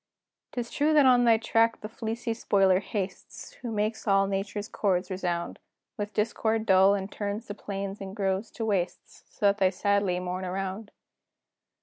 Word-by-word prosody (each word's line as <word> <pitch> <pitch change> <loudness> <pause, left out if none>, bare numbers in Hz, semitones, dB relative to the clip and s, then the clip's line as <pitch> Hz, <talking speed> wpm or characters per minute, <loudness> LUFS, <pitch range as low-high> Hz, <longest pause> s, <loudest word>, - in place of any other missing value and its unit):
'Tis 240 -1 -4
true 300 +2 +2
that 290 -2 +6
on 250 -1 +5
thy 230 -1 +6
track 225 +1 +2
the 215 - -5
fleecy 230 +1 -3
spoiler 195 -4 +3
hastes, 195 -2 -6
Who 240 -2 -4
makes 215 +1 -2
all 195 -1 +4
Nature's 200 +2 -3
chords 190 -3 0
resound 175 -2 -3 0.4
With 210 -2 -5
discord 220 0 0
dull, 195 -1 +5
and 195 0 -4
turns 205 +2 -4
the 205 - -6
plains 200 -1 -5
and 195 0 -7
groves 195 +1 -1
to 225 - -3
wastes, 180 -4 -3
So - - -4
that 200 +1 +4
they 190 -1 +4
sadly 200 -1 +1
mourn 180 +1 -4
around. 195 +3 -4
200 Hz, 165 wpm, -28 LUFS, 190-220 Hz, 0.4 s, that